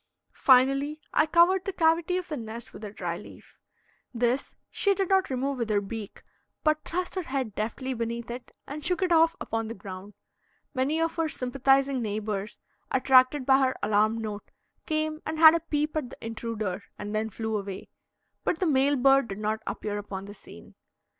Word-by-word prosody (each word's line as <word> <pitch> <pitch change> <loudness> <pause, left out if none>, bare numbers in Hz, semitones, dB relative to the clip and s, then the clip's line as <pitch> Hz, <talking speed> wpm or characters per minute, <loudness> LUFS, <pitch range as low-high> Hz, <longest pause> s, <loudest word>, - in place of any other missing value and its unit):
Finally, 275 +3 +4
I 305 - +4
covered 355 +3 +4
the 390 - -1
cavity 335 +1 +2
of 365 - -4
the 310 - -3
nest 230 -2 -7
with - - -11
a 210 - -5
dry 175 -4 -4
leaf. - - -15 0.6
This 245 +3 0 0.2
she 400 -1 +2
did 385 -2 -1
not 385 -1 +3
remove 265 +1 -2
with 230 -2 -2
her 210 -1 +3
beak, 205 +1 -7 0.4
but 310 0 +2
thrust 360 +2 -3
her 375 - -1
head 265 - -3
deftly 235 +6 -3
beneath 235 0 -4
it 245 +1 -8
and 295 +2 -7
shook 360 +2 0
it 365 - 0
off 330 0 +5
upon 225 0 -3
the 230 - -6
ground. 190 +1 -9 0.6
Many 280 +4 0
of 330 0 -1
her 325 -1 +1
sympathizing 270 0 +1
neighbors, 210 -1 -3 0.3
attracted 260 +1 +4
by 265 0 +5
her 260 -1 +2
alarm 215 +2 +2
note, 210 -2 -6 0.4
came 310 0 -1
and 315 - -4
had 315 0 +9
a 335 - +2
peep 305 -1 -2
at 295 -6 -2
the - - -11
intruder 220 -4 -4 0.2
and 205 0 -6
then 220 +1 -1
flew 220 +1 -3
away, 195 -2 -5 0.6
but 350 - 0
the 370 - 0
male 285 -2 +3
bird 270 0 +4
did 195 -2 -6
not 215 +1 -1
appear 205 -1 -3
upon 195 -1 -6
the 205 - -9
scene. 85 - -14
260 Hz, 185 wpm, -27 LUFS, 215-310 Hz, 0.6 s, had